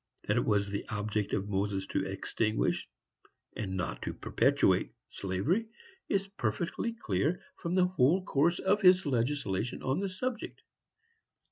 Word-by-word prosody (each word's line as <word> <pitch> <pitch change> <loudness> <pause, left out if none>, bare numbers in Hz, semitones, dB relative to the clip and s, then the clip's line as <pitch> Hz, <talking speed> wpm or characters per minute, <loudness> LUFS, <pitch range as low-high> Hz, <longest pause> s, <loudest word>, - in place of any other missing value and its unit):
That - - +1
it - - +2
was 100 -1 +2
the 100 0 -3
object 105 -1 -2
of 95 - 0
Moses 100 -1 -1
to 95 - 0
extinguish, 100 - -1 0.7
and 95 -3 -3
not 85 -4 -3
to - - -4
perpetuate, - - +2 0.2
slavery, 130 - 0 0.4
is 195 -1 +1
perfectly 180 - -2
clear 155 - 0 0.2
from 170 +1 -2
the 185 -1 +5
whole 180 +1 +3
course 165 +5 +2
of 205 +2 +2
his 185 -1 +6
legislation 120 -5 -1
on 135 +5 0
the 195 0 -1
subject. 240 +5 -4
130 Hz, 140 wpm, -31 LUFS, -, 0.7 s, his